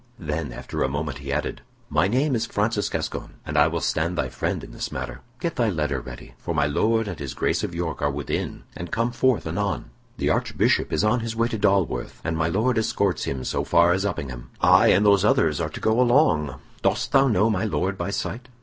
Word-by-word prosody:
Then, 75 -3 -3
after - - -5
a - - +3
moment, 70 -2 -3
he - - -5
added: - - -2 0.3
"My 75 +5 +2
name 135 +7 +1
is 115 -1 0
Francis 105 0 0
Gascoyne, - - -4
and 75 - -5
I 75 0 +6
will 85 0 -2
stand 85 +3 0
thy 65 -1 0
friend 65 -1 -2
in - - -10
this - - -5
matter. - - -5 0.2
Get 170 +2 -3
thy 115 -2 +2
letter 75 -7 -1
ready, - - -10
for 85 - -4
my 75 -2 +3
Lord 110 +9 +1
and 90 -6 -5
his 70 -3 -5
Grace - - 0
of 85 - -3
York 85 -2 -3
are 70 - +2
within 70 -1 -3
and 85 +2 -6
come 115 +5 0
forth 130 0 +1
anon. 85 -4 -2 0.3
The - - +1
Archbishop - - +1
is 80 - +1
on 110 +3 +3
his 115 0 -4
way 115 +1 +1
to 110 - -2
Dalworth, 100 -3 +1
and 80 - -1
my 80 0 +1
Lord 110 +7 +1
escorts 100 -3 0
him 65 -2 -3
so - - -1
far 85 +1 +4
as 95 +1 0
Uppingham. 65 -11 -4
I - - +6
and 100 +3 +5
those 100 -2 +5
others 80 -7 +3
are - - -1
to - - -8
go 110 +3 +2
along. 120 - +3 0.3
Dost 100 +5 0
thou 135 0 +5
know 110 -1 +3
my 95 -2 0
Lord 95 -2 -1
by 100 - -3
sight?" 125 +5 -4
95 Hz, 225 wpm, -24 LUFS, 75-110 Hz, 0.3 s, I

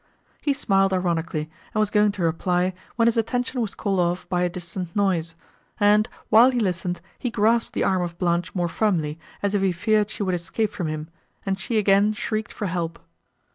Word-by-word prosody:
He 285 - +1
smiled 195 -7 +2
ironically, 170 -4 -1 0.3
and - - +2
was 215 -1 +2
going 210 -1 +4
to 190 - -3
reply, 180 +2 +1 0.2
when 230 -1 +3
his 235 - +2
attention 245 +2 0
was 215 -3 -3
called 195 -3 -1
off 175 +1 0
by 180 -2 +1
a 180 - +2
distant 175 0 -6
noise; 175 -5 +1 0.4
and, 210 +1 +4 0.2
while 235 +4 +7
he 250 -2 0
listened, 180 -3 -1 0.2
he 250 - -1
grasped 225 +2 +2
the - - 0
arm 185 -1 +2
of 170 -1 -4
Blanche 175 0 0
more 175 -2 +1
firmly, 165 -5 0 0.2
as 200 0 +1
if 205 - +2
he 195 -1 +3
feared 210 +4 +1
she 210 - -3
would 185 -2 0
escape 190 +5 -1
from 175 - -3
him, 155 0 -4 0.4
and 195 -1 -1
she 220 +4 -1
again 205 0 +4
shrieked 215 0 -3
for 210 - -4
help. 170 -3 -2
190 Hz, 200 wpm, -24 LUFS, 175-215 Hz, 0.4 s, while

